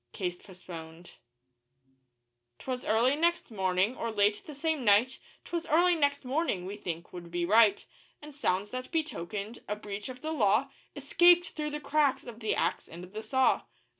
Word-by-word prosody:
(Case 180 -2 -3
postponed.) 175 -3 -11 1.4
'Twas 255 - -5
early 235 +5 +3
next 340 -3 0
morning, 190 +2 +1
or 230 - -3
late 205 0 +2
the 300 - -8
same 310 -1 -1
night 230 +4 +4 0.3
''Twas 340 -1 -4
early 350 +3 +5
next 285 -4 +1
morning' 255 - -1
we 195 +2 -5
think 170 -4 -6
would 175 -1 -8
be 175 0 -1
right 210 +1 +4 0.3
And 300 0 -11
sounds 205 -7 -1
that 255 0 -5
betokened 220 - -3
a 210 - -2
breach 205 +1 -7
of 255 +2 -9
the 315 - -2
law 235 +1 +2 0.2
Escaped 345 +5 +4
through 300 -1 -4
the 300 0 -4
cracks 295 -2 +1
of 235 -2 -9
the 220 -2 0
Axe - - -1
and 170 +2 -10
the 215 - -5
Saw. 260 +3 +2
230 Hz, 165 wpm, -30 LUFS, 200-290 Hz, 1.4 s, early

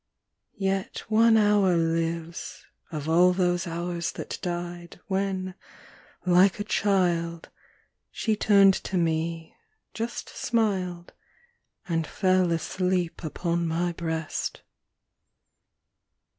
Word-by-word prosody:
Yet 195 -1 -2
one 225 +1 +5
hour 205 -4 +4
lives, 165 0 -2 0.3
of 155 -2 -5
all 175 +3 +5
those 180 -1 +1
hours 170 0 -3
that - - -6
died, 175 0 -5
When, 190 -1 -2 0.7
like 180 +2 +4
a - - -1
child, 175 -5 0 0.6
She 220 -2 -1
turned 200 -2 +5
to 190 - -1
me, 165 0 -1 0.4
just 230 +2 -4
smiled, 190 -7 -1 0.7
And 165 -3 -1
fell 185 -2 +2
asleep 180 +1 -1
upon 170 +1 -1
mv 170 +1 -1
breast. 160 -2 -3
175 Hz, 95 wpm, -26 LUFS, 170-195 Hz, 0.7 s, one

